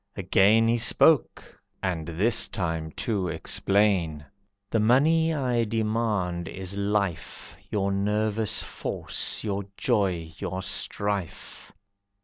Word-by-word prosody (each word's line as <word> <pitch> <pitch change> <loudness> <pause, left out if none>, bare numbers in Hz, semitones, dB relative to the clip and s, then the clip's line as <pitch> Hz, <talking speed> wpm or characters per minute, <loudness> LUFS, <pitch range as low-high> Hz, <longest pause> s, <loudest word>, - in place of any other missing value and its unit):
Again 100 +4 +4
He 115 +1 +2
spoke, 145 +5 +2 0.2
and 85 -4 -2
this 105 +8 +3
time 80 -4 -3
to 100 -5 -2
explain. 85 -2 0 0.5
"The 115 - +2
money 155 +9 +3
I 125 -6 0
demand 105 -6 -1
is 95 +2 -6
Life, 100 -4 -2
Your 100 -1 -1
nervous 105 +2 0
force, - - -3
your 100 -2 -3
joy, 90 -6 0
your 95 +1 -4
strife!" 100 -1 -4
100 Hz, 105 wpm, -26 LUFS, 90-110 Hz, 0.5 s, Again